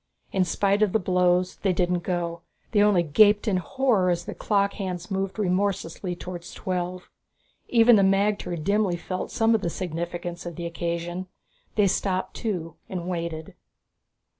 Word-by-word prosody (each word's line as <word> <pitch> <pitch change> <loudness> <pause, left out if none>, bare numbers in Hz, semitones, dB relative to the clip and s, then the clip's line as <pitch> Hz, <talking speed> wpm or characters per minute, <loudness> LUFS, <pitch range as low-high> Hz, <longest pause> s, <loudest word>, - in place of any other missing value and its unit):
In 190 -1 +2
spite 200 +4 +1
of 210 -3 +3
the 220 - +3
blows, 180 -1 +2
they 195 -2 +1
didn't 175 0 +1
go; 170 -1 -3 0.3
they 205 - +4
only 205 -4 +4
gaped 205 +7 +4
in 195 -3 +2
horror 215 -1 +1
as 175 -1 0
the - - -5
clock 200 -1 +1
hands 180 -2 -5
moved 195 +1 -2
remorselessly 185 -2 -1
towards 175 0 -8
twelve. 180 0 -4 0.6
Even 230 -1 +6
the - - +5
magter 195 -2 +1
dimly 195 +2 +1
felt 185 +1 -4
some 225 0 +2
of 220 - +2
the 170 - -1
significance 175 0 -4
of 175 -2 -6
the 170 - -5
occasion. 170 +2 -3 0.5
They 210 - +4
stopped 190 0 0
too 175 -8 -3
and 180 -2 -4
waited. 170 -3 -4
185 Hz, 160 wpm, -25 LUFS, 175-200 Hz, 0.6 s, Even